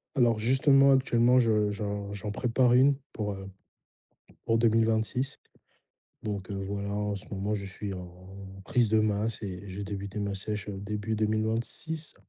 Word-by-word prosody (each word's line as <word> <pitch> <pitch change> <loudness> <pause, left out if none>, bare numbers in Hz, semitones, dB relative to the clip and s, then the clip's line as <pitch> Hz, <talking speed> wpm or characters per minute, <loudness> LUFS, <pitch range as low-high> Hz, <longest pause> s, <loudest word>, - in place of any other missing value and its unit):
Alors 120 -4 +3
justement, 135 +4 +5
actuellement, 125 -2 +4
je 105 -3 +2
j'en 100 -1 -4
j'en 105 +1 -5
prépare 125 +2 +2
1 135 +3 +5 0.2
pour, 105 -2 -2
heu, 95 0 -8 1.0
pour 115 0 +2
2026. 115 +3 +1 0.8
Donc 100 -3 -4
heu, - - -3
voilà, 100 +1 -4
en 105 0 -1
ce 95 - -8
moment, 100 +2 -2
je 100 -1 -4
suis 100 +1 -5
en 95 +2 -10
prise 125 -6 +2
de 110 +1 +3
masse 110 +1 0
et 95 0 -6
j'ai 100 +2 -5
débuté 100 0 -5
ma 100 -1 -2
sèche, 105 +1 -4
heu, 95 - -6
début 105 +2 -3
2026. 110 +9 -1
105 Hz, 155 wpm, -28 LUFS, 100-115 Hz, 1.0 s, justement